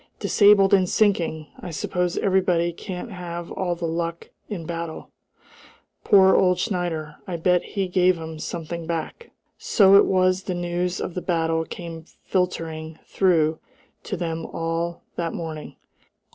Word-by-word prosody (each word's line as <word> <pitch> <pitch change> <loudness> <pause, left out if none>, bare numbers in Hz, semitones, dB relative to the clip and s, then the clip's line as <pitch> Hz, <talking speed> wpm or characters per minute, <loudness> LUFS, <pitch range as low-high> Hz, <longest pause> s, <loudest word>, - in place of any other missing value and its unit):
"Disabled 200 -1 +5
and 185 -2 +4
sinking! 170 -7 +1
I - - -7
suppose 175 +2 -2
everybody 180 -3 +2
can't 185 +6 -7
have 175 -2 -6
all 180 -2 -1
the 170 0 -4
luck 165 +1 -3 0.2
in 195 -6 -4
a - - -11
battle. 165 -1 -6 0.9
Poor 190 -1 +6
old 180 -1 +4
Schneider! 175 -6 -2
I 180 - -3
bet 180 +1 +3
he 195 -2 -3
gave 180 0 +3
'em 160 -1 -7
something 170 0 -5
back!" 170 - -4 0.3
So 195 -2 +5
it - - +6
was 185 0 +2
the 185 - -2
news 175 +1 -2
of 180 - -4
the 180 - -3
battle 165 -2 0
came 165 -2 -8 0.2
filtering 160 -4 -2
through 160 -4 +2 0.5
to 200 - -3
them 165 -1 -3
all 165 +1 -3
that 170 -1 -2
morning. 160 -2 -6
175 Hz, 145 wpm, -24 LUFS, 165-185 Hz, 0.9 s, Poor